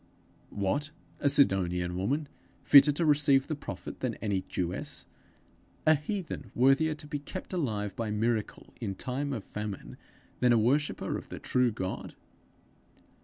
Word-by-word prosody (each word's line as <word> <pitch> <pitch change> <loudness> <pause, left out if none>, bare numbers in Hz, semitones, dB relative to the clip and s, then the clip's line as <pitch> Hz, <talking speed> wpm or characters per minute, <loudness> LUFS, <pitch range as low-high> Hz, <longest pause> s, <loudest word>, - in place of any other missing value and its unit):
What! 105 +10 0 0.3
a 140 - +3
Sidonian 90 -10 +2
woman 140 +11 -1 0.4
fitter 140 +1 +8
to 165 +3 0
receive 145 -2 +4
the 155 - -3
prophet 145 - -7
than 125 -3 -2
any 100 -3 -1
Jewess! 90 0 -3 0.8
a 155 - +7
heathen 155 - -4
worthier 135 +5 +4
to 150 - -11
be 150 -1 -4
kept 185 +7 -7
alive 110 - -2
by 115 -2 -2
miracle 110 0 -1
in 100 -4 -3
time 135 +7 -3
of 115 -7 -3
famine, 100 - -6 0.4
than 125 -1 +5
a - - +5
worshipper 135 +7 +1
of - - -15
the - - -6
true 125 -1 +1
God! 95 -3 -5
125 Hz, 145 wpm, -30 LUFS, 105-145 Hz, 0.8 s, fitter